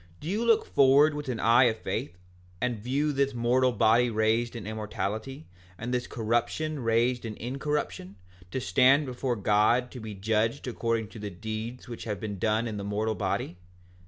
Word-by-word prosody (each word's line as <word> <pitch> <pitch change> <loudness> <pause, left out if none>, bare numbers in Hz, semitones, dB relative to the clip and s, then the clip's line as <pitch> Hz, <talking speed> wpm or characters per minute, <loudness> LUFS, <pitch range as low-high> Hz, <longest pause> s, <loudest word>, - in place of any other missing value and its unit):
Do 150 - -8
you 210 +6 0
look 230 -2 +3
forward 140 +3 +5
with 145 -2 -5
an 120 -3 -2
eye 120 +3 +5
of 115 -2 +1
faith, 90 -4 -4 0.4
and 120 -1 -1
view 140 +7 0
this 140 -1 0
mortal 125 +2 +2
body 115 +2 +3
raised 110 +2 +1
in 115 -4 -6
immortality, 110 +5 -4 0.3
and 120 +5 -4
this 125 0 -1
corruption 120 +7 -1
raised 120 +1 +1
in 110 -2 -6
incorruption, 125 -8 -3 0.3
to 130 - -3
stand 135 +4 +4
before 125 -1 -2
God 105 +4 +2
to 125 - -8
be 110 -2 -7
judged 110 +6 0
according 115 -3 -1
to 110 - -11
the 105 0 -5
deeds 110 +5 -6
which 120 -2 -7
have 105 -4 -3
been 100 -2 -5
done 110 +3 +1
in 110 -2 -4
the 100 - -4
mortal 105 +2 -1
body? 90 -3 -2
115 Hz, 180 wpm, -28 LUFS, 110-130 Hz, 0.4 s, forward